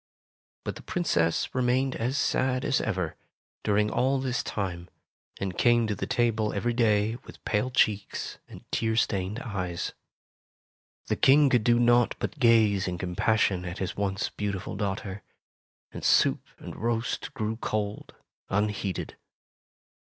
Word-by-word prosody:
But - - -4
the - - -10
Princess 85 - 0
remained 130 +1 +1
as 125 +5 -1
sad 130 -2 +1
as - - +2
ever, 95 -7 -2 0.5
during 105 0 +2
all 135 +2 +2
this 130 -1 -1
time, 90 -3 -4 0.5
and 95 -2 -3
came 120 +2 +4
to 105 - -1
the 100 - -4
table 110 -3 +1
every 120 +4 0
day 110 -1 +2
with - - -14
pale 110 +3 +1
cheeks 105 -5 0
and - - -12
tear 110 -1 0
stained 100 -1 0
eyes. 90 -7 -3 1.1
The - - 0
King 140 0 +5
could 120 -3 +3
do 120 +1 +4
naught 120 0 +4
but 155 - -4
gaze 110 -6 +4
in 90 -1 -2
compassion 90 +1 +1
at 85 0 -5
his 95 - -3
once 100 +1 -1
beautiful 100 -2 -4
daughter, 100 -1 -3 0.7
and - - -8
soup - - +3
and - - -9
roast 115 +4 -2
grew 110 -2 -2
cold, 105 -2 -3 0.3
unheeded. 100 -2 -2
110 Hz, 140 wpm, -27 LUFS, 100-120 Hz, 1.1 s, King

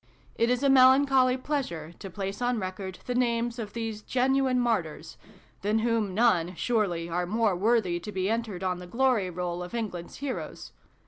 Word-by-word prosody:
It 230 - +1
is 250 +2 +1
a - - +4
melan 265 +1 +7
choly 260 -2 +3
pleasure 170 - -3
to 195 - -7
place 195 +3 -5
on 245 0 +1
record 185 -1 -5
the 250 - -2
names 240 -1 0
of 210 -3 -6
these 225 -2 -4
genuine 260 +1 +1
martyrs 185 -10 -1 0.5
than 210 +2 +1
whom 220 -5 0
none, 185 -6 +2
surely, 190 -7 0
are 175 +1 -2
more 215 0 +1
worthy 195 -3 +1
to 210 +5 -7
be 190 -1 -1
entered 220 -4 -2
on 180 -1 -1
the 180 - -9
glory 235 -2 +1
roll 175 0 -3
of 180 +6 -6
England 185 -7 -4
s - - -13
heroes 280 -2 -5
220 Hz, 185 wpm, -28 LUFS, 180-245 Hz, 0.5 s, melan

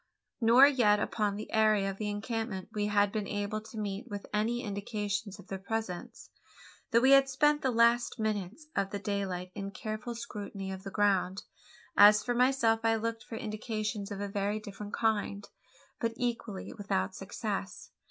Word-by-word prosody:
Nor 235 +4 +8
yet 240 -7 +4
upon 210 -1 0
the 210 - -7
area 215 -2 +4
of 195 - -10
the 210 -1 -2
encampment 210 -2 -3 0.2
had 205 0 +4
we 215 - 0
been 200 - -5
able 205 +1 -2
to 220 +1 -11
meet 205 +3 -4
with 205 -3 -6
any 230 +3 0
indications 205 0 -3
of - - -14
their 190 0 -5
presence: 200 -3 -5 0.6
though 230 -2 +4
we 265 +2 +5
had 275 0 +7
spent 295 +3 +3
the 265 - +1
last 235 0 +3
minutes 215 - -2
of 195 -1 0
daylight 190 -3 -2
in 195 -1 -5
a - - -7
careful 215 +4 -5
scrutiny 205 -4 -6
of 190 0 -6
the 195 - -6
ground. 195 -2 +1 0.5
As 210 +1 +8
for 245 - 0
myself 240 -2 +3
I 225 0 +3
looked 225 0 -3
for 225 - -8
indications 215 -1 -3
of 200 - -5
a 205 - -2
very 200 +1 -1
different 205 0 -7
kind; 205 -2 0 0.5
but 230 0 -1
equally 230 -5 -3
without 145 - -1
success. - - -5
210 Hz, 170 wpm, -31 LUFS, 200-230 Hz, 0.6 s, Nor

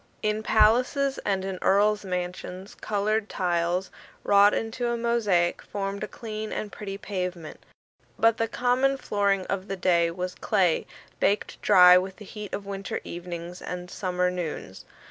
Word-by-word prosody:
In 215 0 0
palaces 250 +6 +3
and 190 -2 -1
in 190 -1 -4
earls' 210 +2 +3
mansions 180 +1 -5
coloured 215 +1 -1
tiles, 175 +1 -1 0.3
wrought 205 0 +6
into 225 +2 -2
a 235 0 0
mosaic, 215 -7 +1
formed 200 0 -4
a - - -3
clean 215 -1 -6
and 210 - -4
pretty 195 -2 -6
pavement; 180 -5 -5 0.5
but 225 0 +4
the 225 - 0
common 255 +3 +1
flooring 200 -5 0
of 195 0 -3
the 195 - -4
time 170 -2 +2
was 180 0 -3
clay, 185 -6 +1 0.3
baked 205 +1 0
dry 180 0 +8
with 190 +1 -5
the 210 - -12
heat 210 0 -8
of 200 - -4
winter 195 -1 -4
evenings 175 0 -7
and 180 0 -6
summer 180 -1 -1
noons. 160 - -5
195 Hz, 150 wpm, -26 LUFS, 180-215 Hz, 0.5 s, dry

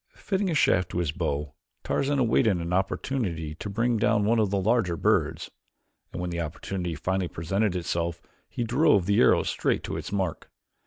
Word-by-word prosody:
Fitting 195 -1 -1
a 165 - 0
shaft 90 -10 +3
to - - -5
his 85 -4 0
bow 75 -1 -3 0.3
Tarzan 140 +1 0
awaited 115 -5 +3
an 85 +1 -3
opportunity 95 - -1
to 100 +7 -7
bring 115 +4 +1
down 110 -2 +2
one 115 +2 +3
of 105 -3 +2
the 100 0 0
larger 100 -4 +1
birds, - - 0 0.6
and - - -6
when 90 0 -3
the 85 0 -2
opportunity 85 +2 -4
finally 95 +4 -1
presented 95 +5 -1
itself 85 -1 -2 0.3
he 120 - -3
drove 120 - +3
the 100 +2 +2
arrow - - +5
straight - - -1
to - - -4
its - - -6
mark. 95 -5 -2
95 Hz, 180 wpm, -26 LUFS, 85-115 Hz, 0.6 s, arrow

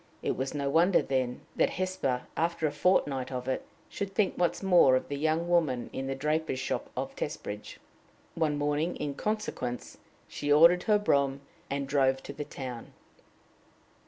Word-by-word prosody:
It - - 0
was 135 +2 -3
no 140 -1 -1
wonder, 170 +6 +4
then, 130 -2 -1
that - - +3
Hesper, 185 -9 -1
after 165 0 0
a 150 - +1
fort 180 +6 +3
night 135 -3 -4
of 125 0 -4
it, 130 - -1 0.2
should 195 -1 -5
think 200 -1 +2
once 175 +2 0
more 175 -9 +6
of 130 - -1
the 145 - -2
young 160 +3 0
woman 160 -8 +1
in 135 0 -3
the 135 - -2
draper's 150 +1 -1
shop 130 - -3
of - - -3
Testbridge. 105 +1 -5 0.6
One 155 -3 0
morning, 150 +4 0
in 145 - -3
consequence, 140 - -3 0.3
she 145 - -3
ordered 170 +4 +7
her 210 -2 +5
brougham, 140 -8 +1 0.3
and 140 0 -2
drove 135 -1 +2
to 140 - -7
the 150 - -5
town. 125 -5 -7
145 Hz, 170 wpm, -29 LUFS, 135-170 Hz, 0.6 s, ordered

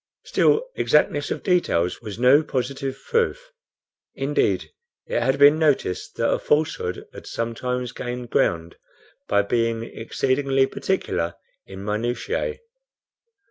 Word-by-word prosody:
Still 455 +3 +2
exactness 145 -1 +2
of - - -4
details 120 - +1
was 105 -3 -7
no 130 +5 +6
positive 135 -1 -3
proof. 485 +2 0 0.6
Indeed, - - 0 0.3
it - - -1
has 135 +3 +2
been 145 +2 +7
noticed 145 - 0
that - - +1
a - - 0
falsehood 150 - 0
has - - -10
sometimes 125 +2 -3
gained 125 -1 -6
ground 85 0 0 0.5
by 100 0 +3
being 115 +1 0
exceedingly 135 +4 0
particular 85 - -2 0.3
in 95 +1 -9
minutiae. 120 - -2
125 Hz, 115 wpm, -23 LUFS, 115-145 Hz, 0.6 s, been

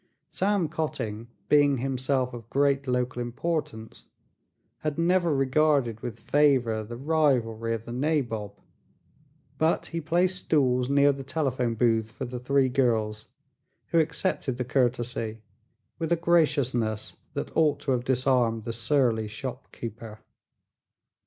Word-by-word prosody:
Sam 195 -3 +1
Cotting, 115 -8 -4 0.2
being 145 0 +4
himself 130 0 -1
of 115 -2 -9
great 140 0 +1
local 125 0 -1
importance, 120 -3 -4 0.7
had 155 0 -3
never 175 0 +2
regarded 135 -3 +2
with 115 -2 -6
favor 125 -4 +2
the 120 +2 -8
rivalry 125 -6 +1
of 115 0 -8
the - - -7
nabob, 120 -7 -2 1.0
but 160 +1 +2
he 165 - -2
placed 175 +4 +1
stools 125 -4 +2
near 140 0 +5
the 140 0 -6
telephone 130 -4 -1
booth 110 -2 +1
for 135 - -5
the 125 0 -6
three 135 +2 +2
girls, 110 -5 0 0.6
who 165 - +3
accepted 160 -4 -1
the 125 - -2
courtesy 120 -3 0 0.6
with 165 0 -2
a - - +5
graciousness 140 -10 +1 0.2
that - - -4
ought 150 -3 +3
to 135 - -1
have 125 -2 0
disarmed 125 -3 +1
the 115 0 -4
surly 115 -2 +1
storekeeper. 115 -1 -7
130 Hz, 125 wpm, -27 LUFS, 115-150 Hz, 1.0 s, near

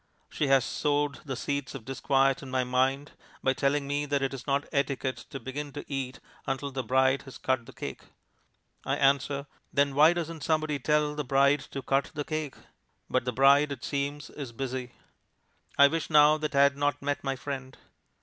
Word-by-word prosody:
She 150 - -1
has 135 -2 +4
sowed 145 -1 0
the 135 -2 -3
seeds 140 +2 -3
of 120 -5 -8
disquiet 135 +1 +1
in 135 - -9
my 130 0 +1
mind 130 +3 0 0.3
by 130 - +3
telling 140 +1 +1
me 145 +1 -1
that 140 -1 0
it 135 - -1
is 130 0 -8
not 140 0 +1
etiquette 140 -2 -1
to 135 - -6
begin 140 +4 -5
to - - -7
eat 135 -2 -4 0.3
until 135 +1 -2
the 130 0 -2
bride 130 +1 +2
has 135 - -11
cut 130 -3 -1
the - - -10
cake. 70 - -7 0.8
I - - 0
answer, 140 +1 +2 0.3
"Then 140 -1 +2
why 155 +4 +6
doesn't 165 -2 -4
somebody 155 -1 0
tell 150 +2 +1
the 150 0 -3
bride 140 +2 +3
to 135 - -6
cut 135 +1 +1
the 150 - -2
cake?" 155 -3 -3 0.6
but 130 -1 +1
the 125 - 0
bride, 140 +3 +5
it 135 -4 -6
seems, 145 +1 -3
is 140 -5 -7
busy. 125 0 -5 0.8
I 140 - +9
wish 165 +2 -2
now 150 0 +6
that 150 -1 -3
I 140 - +6
had 140 0 +3
not 145 0 0
met 145 0 -1
my 135 -1 -1
friend. 130 -1 -6
140 Hz, 195 wpm, -28 LUFS, 130-145 Hz, 0.8 s, I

